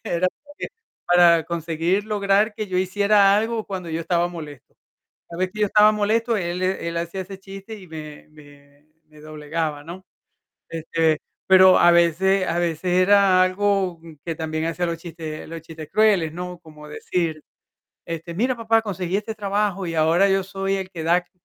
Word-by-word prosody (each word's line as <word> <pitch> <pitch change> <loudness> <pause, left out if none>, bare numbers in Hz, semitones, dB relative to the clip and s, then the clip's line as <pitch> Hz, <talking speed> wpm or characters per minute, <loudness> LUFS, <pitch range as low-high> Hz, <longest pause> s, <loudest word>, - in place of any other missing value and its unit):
era 175 +2 0 0.2
porque 290 0 -8 0.4
para 175 -2 +5
conseguir 170 +4 -1
lograr 210 0 +1
que 215 -1 -4
yo 185 -2 -1
hiciera 200 +1 +3
algo 225 0 -1
cuando 185 -4 -6
yo 160 +1 -2
estaba 175 +1 0
molesto. 150 -7 -10 0.6
Cada 170 +1 -8
vez 185 - 0
que 215 0 -6
yo - - +5
estaba 210 +1 +5
molesto, 220 +2 0
él 175 0 -3
él 170 -3 -2
hacía 170 +3 -4
ese 190 +1 -9
chiste 195 +3 -10
y 185 - -14
me 155 -2 -10
me 145 -1 -19 0.2
me 155 -1 -19
doblegaba, 155 0 -4
¿no? 180 +4 -10 0.6
Este, 160 -1 0 0.3
pero 190 0 +7
a 175 - +6
veces 185 +3 +3
a 170 - -1
veces 170 -1 -2
era 185 0 +5
algo 185 -2 0 0.2
que 165 - -3
también 160 0 -3
hacía 170 +2 -2
los 170 -1 -3
chistes 165 -2 -8
los 165 0 -8
chistes 160 -2 -10
crueles, 200 -8 +3
¿no? 180 +1 -6
Cómo 150 -2 -13
decir: 160 0 -3 0.6
"Este, 165 +1 -6
mira, 245 +8 0
papá, 225 -1 +2
conseguí 190 -3 -3
este 215 +1 -5
trabajo, 200 -2 -1
y 165 - -4
ahora 165 +5 +3
yo 195 0 +2
soy 195 +1 -2
el 190 -1 -5
que 165 -4 -7
da 170 +2 +3
c 175 - -31
180 Hz, 175 wpm, -22 LUFS, 165-195 Hz, 0.6 s, pero